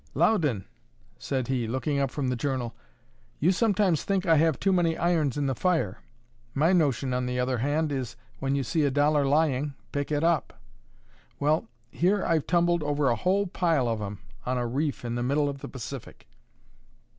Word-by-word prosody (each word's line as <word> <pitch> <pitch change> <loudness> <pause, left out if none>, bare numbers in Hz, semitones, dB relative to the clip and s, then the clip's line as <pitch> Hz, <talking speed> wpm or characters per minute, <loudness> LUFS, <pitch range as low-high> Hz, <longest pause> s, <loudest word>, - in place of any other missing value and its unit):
"Loudon," 150 - +2 0.5
said 130 -3 -2
he, 125 -4 -1
looking 135 +4 -1
up 135 -1 +1
from 135 -1 -2
the 125 - 0
journal, 125 -2 -2 0.7
"you 170 +6 +4
sometimes 195 -5 +2
think 195 -1 0
I 165 -2 +5
have 160 -1 +2
too 195 0 +2
many 170 -3 +2
irons 160 -6 +1
in 145 - 0
the 135 - +1
fire. 145 - 0 0.6
My 160 +6 +3
notion, 140 -6 +1
on 125 0 -1
the 125 0 -2
other 125 -1 0
hand, 145 +4 0
is, 125 -4 -3 0.2
when 135 0 0
you 140 - 0
see 155 +5 0
a 140 - +3
dollar 145 +1 +2
lying, 145 -1 +1 0.2
pick 145 +1 -3
it 145 +1 +1
up! 165 -3 0 0.8
Well, 150 -2 +1 0.2
here 190 +3 +1
I've 160 -3 +1
tumbled 175 -1 +2
over 145 -2 +1
a - - +2
whole 190 - +1
pile 165 -8 +1
of 115 -2 -1
'em 105 0 -5 0.3
on 125 0 -1
a 120 - -1
reef 140 +2 -2
in 120 - -2
the 120 - -2
middle 140 +4 +1
of 140 -1 -4
the - - -7
Pacific." 130 0 -8
145 Hz, 190 wpm, -27 LUFS, 130-165 Hz, 0.8 s, I